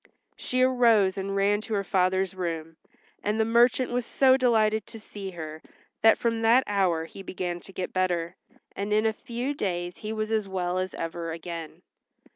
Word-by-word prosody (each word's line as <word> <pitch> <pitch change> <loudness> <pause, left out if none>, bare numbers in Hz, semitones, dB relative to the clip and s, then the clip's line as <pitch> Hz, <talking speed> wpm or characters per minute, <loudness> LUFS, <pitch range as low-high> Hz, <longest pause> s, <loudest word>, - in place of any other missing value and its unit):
She 255 0 0
arose 230 -7 +4
and 195 0 -3
ran 200 +1 +2
to 220 0 -3
her 200 - 0
father's 190 0 +1
room, 165 -3 -4 0.4
and 210 +2 -1
the 220 - +3
merchant 240 +2 +3
was 245 0 0
so 260 +2 +4
delighted 220 -4 +2
to 225 - -9
see 205 -2 -8
her 160 -3 -7 0.4
that 225 - +6
from 230 -1 -1
that 235 +3 +5
hour 185 -5 +1
he 195 - -11
began 180 -2 -4
to 195 - -12
get 185 -1 -5
better, 180 -2 0 0.4
and 200 +1 -3
in 215 +1 +3
a 220 - +2
few 240 +5 -4
days 175 -8 -3
he 215 - -5
was 215 0 -3
as 215 -2 0
well 185 -1 -1
as 185 0 -3
ever 165 0 -4
again. 165 -1 -7
195 Hz, 185 wpm, -27 LUFS, 180-225 Hz, 0.4 s, that